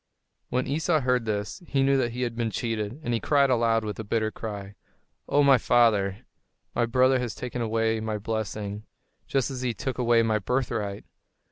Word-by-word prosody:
When 125 +1 0
Esau 155 +2 +1
heard 125 -2 +1
this, 105 - -3
he 135 -1 +1
knew 135 0 +3
that 120 -3 0
he 125 +1 -2
had 120 -2 -2
been 115 -1 -1
cheated; 110 +2 -3
and 120 - -1
he 115 - +1
cried 140 0 +3
aloud, 115 -2 +2
with 105 0 -5
a - - -3
bitter 110 +1 0
cry, 100 -3 -6 0.6
"O, 145 - +4
my 135 -2 +6
father, 110 -3 +2 0.5
my 120 - +1
brother 130 +2 +3
has 120 -3 -3
taken 125 -1 -5
away 115 0 +1
my 110 -1 -2
blessing, 105 -1 -4 0.4
just 135 0 0
as 130 -1 -5
he 125 -3 -1
took 130 +4 -4
away 120 -1 +4
my 110 -1 +1
birthright! 110 -2 -2
115 Hz, 190 wpm, -26 LUFS, 110-125 Hz, 0.6 s, my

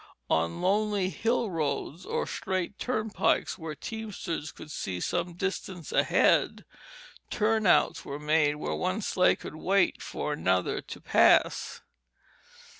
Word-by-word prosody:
On 85 +1 +1
lonely 200 0 +1
hill 230 -1 0
roads 155 +1 -3
or - - -1
straight 190 +1 -3
turnpikes, 220 -6 0
where 160 -2 -5
teamsters 200 -7 -5
could 155 - -11
see 90 -9 -4
some 175 - -2
distance 185 -2 -4
ahead, - - +3 0.6
turnouts 215 -3 +2
were 140 - -5
made 150 0 +2
where 150 - -3
one 185 +4 -1
sleigh 180 -1 +3
could - - -9
wait 195 +4 +2
for 150 - -3
another 95 -9 0
to - - -9
pass. - - +3
180 Hz, 120 wpm, -28 LUFS, 150-205 Hz, 0.6 s, ahead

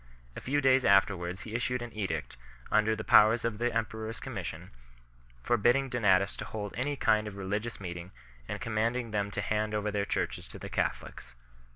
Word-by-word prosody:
A - - -6
few 145 +3 0
days 130 -1 +4
afterwards 95 -3 +3
he 110 - -8
issued 120 +1 -1
an 120 - -8
edict, 105 -3 -3 0.4
under 110 +1 +3
the - - -5
powers 110 +2 +6
of 115 -2 -2
the 120 0 +1
emperor 110 -1 -2
s 115 - -6
commission, - - -6 0.7
forbidding 120 - +3
Donatists 100 -5 +2
to - - -5
hold 105 -2 -5
any 140 +5 -1
kind 110 -5 +2
of 100 -1 -7
religious 105 +4 -3
meeting 90 -2 -6 0.4
and - - -4
commanding 115 +2 -1
them 100 -1 0
to 105 - -3
hand 105 +2 -1
over 105 0 -1
their 100 -1 0
churches - - -2
to - - -10
the - - -8
Catholics. - - -3
110 Hz, 185 wpm, -30 LUFS, 100-120 Hz, 0.7 s, powers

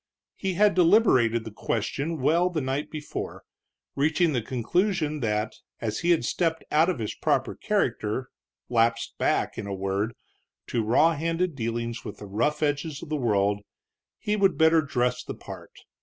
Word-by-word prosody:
He 190 -2 -2
had 205 +2 +4
deliberated 165 - +4
the 110 - -6
question 140 +10 -2
well 170 +7 +3
the 170 -3 -2
night 135 +1 -2
before, 150 -1 -6 0.5
reaching 155 +3 +2
the 125 - +1
conclusion 155 - 0
that, 105 -3 -1 0.3
as 110 -2 -2
he 175 - 0
had 165 -8 +3
stepped 165 +4 0
out 160 +4 +4
of 185 - -1
his 110 -3 -3
proper - - 0
character, 115 +5 -1 0.4
lapsed 115 -1 +1
back, - - 0
in - - -5
a 100 - -3
word, 100 +4 -2 0.5
to 115 - 0
raw 150 +10 +4
handed 165 +3 -1
dealings 115 -2 -3
with 105 - -7
the 105 - -9
rough 150 +10 0
edges 145 0 -1
of 165 - -9
the 155 - -1
world, 105 -6 +1 0.6
he 210 - -1
would 195 -2 +3
better 160 0 +5
dress 125 -4 -1
the - - -6
part. - - -11
140 Hz, 165 wpm, -26 LUFS, 115-165 Hz, 0.6 s, better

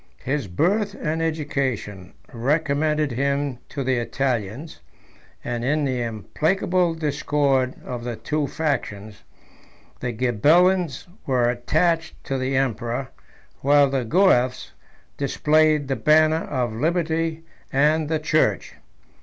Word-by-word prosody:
His 135 -3 -2
birth 195 - 0
and 160 +1 -2
education 135 - -3 0.2
recommended 150 +3 0
him 140 0 -1
to 140 - -4
the 130 0 +1
Italians; 120 - -3 0.6
and 120 -1 -3
in 145 +3 +1
the 130 -2 -1
implacable 165 - 0
discord 145 -4 0
of 120 -2 -5
the 120 -1 -4
two 150 +4 -2
factions, 110 -10 -3 0.8
the 125 - -3
Ghibelins 150 - +2 0.2
were 125 -3 +2
attached 160 +7 0
to 135 -1 -2
the 130 +1 -1
emperor, 120 0 -1 0.5
while 140 0 +4
the 135 -2 0
Guelfs 130 - +2 0.5
displayed 150 +1 +2
the 135 - 0
banner 155 +6 +3
of 125 -5 -2
liberty 165 +4 -1 0.3
and 150 +2 +2
the 160 - +1
church. 155 0 0
140 Hz, 110 wpm, -23 LUFS, 125-155 Hz, 0.8 s, while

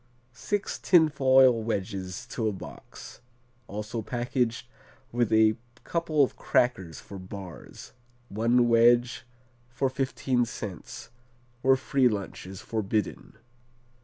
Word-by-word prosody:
Six 200 - -3
tin 165 -4 +5
foil 130 -4 +5
wedges 95 -4 -4
to 115 -3 -1
a - - +1
box; 95 - -11 0.5
also 105 +3 -5
packaged 120 +1 -2 0.5
with 120 -2 0
a 110 0 +4 0.3
couple 160 -3 +1
of 130 - -1
crackers 95 -10 0
for 100 - -10
bars, 95 -2 -10 0.3
one 120 +3 +2
wedge 120 +2 +4 0.4
for 130 +2 -1
fifteen 130 -1 0
cents, 105 -1 -8 0.5
where 135 +1 +5
free 130 -1 +2
lunch 100 -4 -4
is 95 -1 -9
forbidden. 110 -2 -3
120 Hz, 110 wpm, -27 LUFS, 105-130 Hz, 0.5 s, tin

